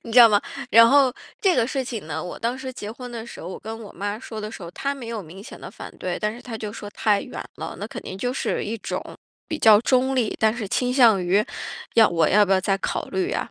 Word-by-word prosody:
你 230 - -8
知 250 - +6
道 235 -1 +11
吗？ 205 -1 +4 0.3
然 230 0 +8
后 270 -2 +5 0.3
这 380 -3 +4
个 230 - +2
事 265 0 -2
情 225 -9 -5
呢， 155 - -4
我 180 - -7
当 235 +2 -1
时 265 -1 -6
结 210 -4 -7
婚 245 +2 -8
的 230 -1 -6
时 - - -10
候， 170 - -7
我 185 - -7
跟 225 +1 -6
我 205 - -10
妈 205 +3 -4
说 220 -3 -7
的 210 - -5
时 210 - -9
候， 170 - -7
她 280 +10 -2
没 250 -4 -8
有 225 -3 -4
明 180 +4 -11
显 270 - -10
地 - - -8
反 - - -10
对， - - -3
但 210 +1 -1
是 240 - -11
她 235 -2 -6
就 210 -1 -5
说 205 -1 -7
太 205 -1 +2
远 - - -7
了， - - -6
那 - - -4
肯 - - -7
定 185 - -7
就 245 +6 -2
是 - - -1
一 225 +2 -4
种 - - -4 0.4
比 315 - -4
较 215 -5 +7
中 260 +2 +2
立， 235 -4 +1
但 220 0 +3
是 220 - -3
倾 250 +3 0
向 230 -8 +6
于 190 +4 +3 0.5
要 225 -1 +7
我 165 -1 +2
要 205 +1 +5
不 195 - +2
要 190 - +4
再 195 +1 0
考 - - -2
虑 190 -1 -1
呀？ - - -3
220 Hz, 300 characters per minute, -23 LUFS, 205-245 Hz, 0.5 s, 道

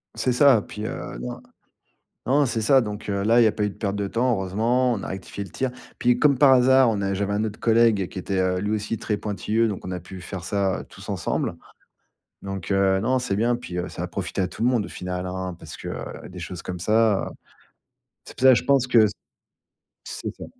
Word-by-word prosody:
C'est 125 - +1
ça, 130 -4 +6
puis 105 +2 -7
heu, - - -5
non, 60 0 -5 0.9
non, 140 +3 +3
non, 145 - +4
c'est 115 -2 -1
ça 135 +4 +5
donc 105 -1 -5
heu, 100 0 -1
là, 115 +3 +4
il - - +7
y - - +6
a - - +2
pas 105 - -2
eu 105 - +1
de - - -11
perte 100 -2 -2
de 100 -1 -2
temps 125 +4 +1
heureusement, 115 +6 +1
on 100 - -4
a - - -4
rectifié 95 +1 -6
le 95 - -12
tir 130 -1 -1 0.3
puis 120 0 +3
comme 145 -2 +4
par 140 -2 +7
hasard, 130 0 +5
on 105 -3 -1
a 100 0 0
j'avais 100 +1 -1
un 105 +1 0
autre 110 -1 -4
collègue 115 -5 +3
qui - - -10
était 95 -1 0
lui 105 +2 -2
aussi 110 +1 -2
très 105 -2 -2
pointilleux 110 +2 0
donc 100 -3 -5
on 90 - -5
a 90 - -3
pu 90 +2 -10
faire 90 0 -7
ça 95 +1 -1
tous - - -12
ensemble - - -2 0.8
donc 95 -1 -5
heu, 95 0 +3
non, 130 +3 +1
c'est 100 -6 -2
bien 120 +3 +1
puis, 105 -8 -7
heu, - - -4
ça - - -6
a - - -3
profité - - -3
à 90 - +1
tout 110 - -5
le 125 - +4
monde 115 -5 +1
au - - -8
final, 90 0 -5
hein, 90 -1 -4
parce - - -9
que - - -7 0.4
des 90 0 -9
choses 85 +1 -6
comme 90 -1 -6
ça, 110 +2 +2 0.9
c'est - - -13
pour 125 - -4
ça 130 - +9
je - - +1
pense 135 -3 +3
que 115 -4 +5
ce 105 - -6 0.9
c'est - - -6
ça - - -8
105 Hz, 240 wpm, -24 LUFS, 95-120 Hz, 0.9 s, ça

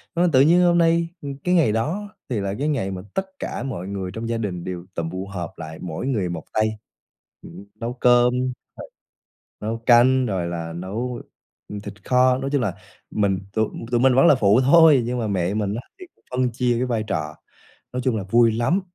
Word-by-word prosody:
rồi 175 +1 +3
tự 130 - +6
nhiên 170 +5 +5
hôm 175 -1 +4
nay, 170 0 +3
ừm, 140 -1 -6
cái 180 0 +2
ngày 160 -11 +4
đó 170 - -2 0.2
thì 120 -5 -1
là 100 0 -2
cái 145 - 0
ngày 130 -11 -1
mà 95 -1 -5
tất 190 - -1
cả - - -4
mọi 105 -9 -5
người 95 -2 -4
trong 115 +1 -5
gia 115 - -1
đình 95 -6 -4
đều 90 -1 -6
tụ 90 +4 -4
họp 90 -4 -6
lại 80 0 -8
mỗi 90 +7 -4
người 105 -10 0
một 85 -2 -5
tay. 110 0 +2 0.7
Ừm - - -12
hưm, 100 - -11
nấu 120 +1 -4
cơm, 120 0 +4 0.4
rồi - - -9 0.7
nấu 110 +2 -2
canh, 130 +2 +5
rồi 95 -6 -2
là 85 -1 -5
nấu, 110 +8 -4 0.5
ừm, 105 - -5
thịt 105 0 -7
kho, 125 0 +4
nói 135 +1 -3
chung 145 -2 +1
là - - -1 0.4
mình 100 -3 +1
tụi 110 -1 +1 0.2
tụi 120 - +2
mình 130 0 +4
vẫn 135 +6 +6
là - - +7
phụ 105 0 +4
thôi 150 -1 +6
nhưng 125 +1 -2
mà 110 - -1
mẹ 95 -2 0
mình 105 -1 -1
á 120 - -4 0.2
thì 370 - -9
cũng - - -37
phân 125 -1 0
chia 120 +1 0
cái 125 - 0
vai 115 -3 -1
trò, 75 -4 -3 0.6
nói 125 - -2
chung 125 -3 +1
là 100 - -3
vui 115 +4 +4
lắm. 120 - +1
115 Hz, 220 wpm, -22 LUFS, 95-130 Hz, 0.7 s, là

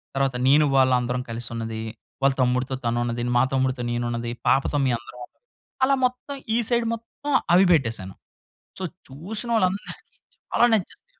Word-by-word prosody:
తర్వాత 135 -2 +1
నేను 150 +2 +6
వాళ్ళందరం 125 -1 +2
కలిసి 115 +1 -5
ఉన్నది, 115 -1 -4 0.4
వాళ్ళ 135 0 +4
తమ్ముడితో 125 +1 +1
తను 120 +1 +1
ఉన్నది, 120 0 -2
మా 120 - +5
తమ్ముడితో 130 -2 0
నేను 120 0 -1
ఉన్నది, 120 0 -3 0.2
పాపతో 140 +2 +2
మే 130 - +2
అందరం - - -13 0.7
అలా 275 - +3
మొత్తం 250 +3 -3 0.2
ఈ - - +3
సైడ్ 235 -1 +2
మొత్తం 230 +5 -6 0.2
అవి 185 +2 +6
పెట్టేసాను. 115 - 0 0.6
సో 190 - -5 0.3
చూసినోళ్ళందరికి 200 - -1 0.6
చాలా 240 - +5
నచ్చేసాయవి. 200 -5 -2
130 Hz, 145 wpm, -24 LUFS, 120-195 Hz, 0.7 s, నేను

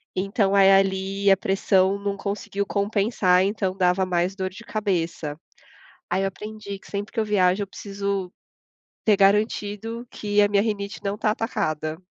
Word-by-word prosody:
então, 195 +1 +1
eh, 195 -1 +7
ali 195 +1 +1
a 195 - +7
pressão 195 0 +2
não 200 0 -3
conseguiu 200 0 -3
compensar, 200 -3 +2
então 195 -2 -1
dava 185 0 +2
mais 180 +1 0
dor 190 -1 -3
de 205 +5 -11
cabeça. 170 -9 -2 0.7
Aí 185 +2 0
eu 195 - +1
aprendi 210 0 -8
que - - -17
sempre 205 +1 -4
que 230 - -1
eu 220 - +1
viajo 195 -1 +2
eu - - -3
preciso 200 -1 -4 0.7
ter 215 -2 +4
garantido 210 +3 +1
que 205 0 +1
a 205 - +4
minha 200 -1 +3
rinite 205 -2 -3
não 200 0 -2
tá 215 0 +1
atacada. 155 - -2
200 Hz, 165 wpm, -24 LUFS, 190-205 Hz, 0.7 s, eh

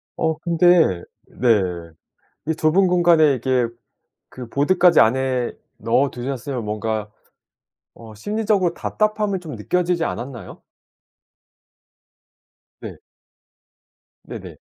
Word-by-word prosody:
어 160 -1 -1
근데 170 - +3 0.3
네. 115 -4 +2 0.9
이 160 - 0
좁은 160 +5 +2
공간에 170 -4 +4
이렇게 130 -1 0 0.6
그 125 -2 -10
보드까지 175 +7 +3
안에 130 +1 +1 0.2
넣어 125 +5 +1
두셨으면 125 -1 -5
뭔가 105 0 -3 0.9
어 115 -2 -13
심리적으로 205 - 0
답답함을 210 -2 -1
좀 160 -4 -8
느껴지지 175 +9 0
않았나요? 120 -5 -7 2.2
네. - - -8 1.3
네네. - - -9
140 Hz, 205 characters per minute, -21 LUFS, 120-175 Hz, 2.2 s, 공간에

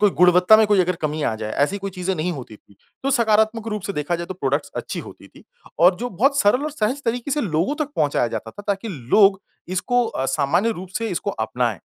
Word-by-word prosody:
कोई 205 -1 +5
गुणवत्ता 180 +4 +6
में 220 0 +4
कोई 205 -2 +4
अगर 180 -1 0
कमी 155 0 -1
आ 110 - 0
जाए। 110 - -4
ऐसी 195 +8 0
कोई 195 0 -5
चीज़ें 185 0 -2
नहीं 170 +1 -2
होती 125 -7 -9
थी। 100 -1 -25 0.3
तो 275 - 0
सकारात्मक 220 -2 +2
रूप 210 -3 -4
से 200 - -4
देखा 150 0 -2
जाए 170 0 -5
तो 185 - -6
प्रोडक्टस 140 -2 -2
अच्छी - - -4
होती - - -13
थी - - -18 0.4
और 180 +2 +6
जो 245 +5 -4
बहुत 275 - +2
सरल 250 +4 +3
और 305 - -2
सहज 275 0 -2
तरीके 240 +3 -2
से 295 +2 +1
लोगों 180 - 0
तक 285 - -15
पहुँचाया 145 -5 +1
जाता 110 0 -5
था 205 - -11
ताकि 200 +2 -2
लोग 195 - +3 0.3
इसको 245 +7 +1
अ, 135 -11 -3
सामान्य 150 +11 +1
रूप 185 -3 -6
से 225 -1 -2
इसको 190 +2 -2
अपनाएँ। 110 - -2
190 Hz, 235 wpm, -22 LUFS, 150-220 Hz, 0.4 s, गुणवत्ता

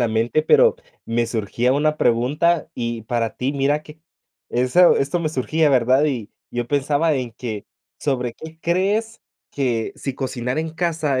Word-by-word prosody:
la 120 - +2
mente, 115 +7 +1
pero 470 - +5 0.3
me 115 0 0
surgía 115 +3 0
una 150 +2 +1
pregunta. 145 +9 +2
Y 115 -2 -3
para 115 -1 -2
ti 130 +3 -1
mira, 145 +2 +1
que 155 +1 -14 0.5
eso 130 +9 +4
esto 140 +6 0
me 155 - 0
surgía, 155 +2 +1
¿verdad? 130 +2 +4
Y 120 -7 -3 0.2
yo 120 -1 -3
pensaba, 145 +4 +1
en 125 -3 -2
que 110 -3 -6 0.3
sobre 125 -4 -1
qué 160 0 -11
crees, 205 +6 0 0.3
que, 120 -5 -1
¿si 135 - -5
cocinar 130 0 -3
en 160 0 -2
casa 160 -5 -1
135 Hz, 160 wpm, -21 LUFS, 120-155 Hz, 0.5 s, pero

